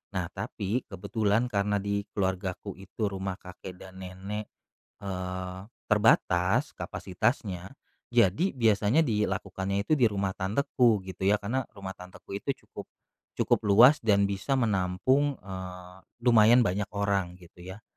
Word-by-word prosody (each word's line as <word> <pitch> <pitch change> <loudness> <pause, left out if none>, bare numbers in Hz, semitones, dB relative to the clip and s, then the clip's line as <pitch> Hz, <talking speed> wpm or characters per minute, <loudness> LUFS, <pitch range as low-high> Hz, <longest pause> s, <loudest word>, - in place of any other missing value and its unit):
Nah, 90 -2 -2
tapi 105 +4 -3
kebetulan 105 +4 0
karena 105 0 +1
di 100 0 -2
keluargaku 95 0 -2
itu 100 +2 -3
rumah 95 -1 -3
kakek 90 0 -10
dan 95 +1 -12
nenek, 95 +3 -6 0.5
eee, 90 -1 -4 0.3
terbatas 95 -4 +3
kapasitasnya, 95 0 -2 0.4
jadi 120 - +3
biasanya 110 +2 +3
dilakukannya 100 -6 -1
itu 155 - +4
di 125 - +3
rumah 100 -1 -2
tanteku 110 +2 +2
gitu 95 0 -5
ya, 105 +1 +3
karena 125 +6 -1
rumah 95 -1 -8
tanteku 90 +2 -9
itu 140 - -2 0.2
cukup - - -8 0.5
cukup - - +1
luas 120 +9 +7
dan 100 -3 +4
bisa 100 +8 -1
menampung, 115 +6 +1
eee, 90 -1 -8 0.3
lumayan 120 +1 +6
banyak 100 +1 0
orang 100 -3 0
gitu 90 0 -15
ya. 95 +4 -9
100 Hz, 130 wpm, -28 LUFS, 95-110 Hz, 0.5 s, luas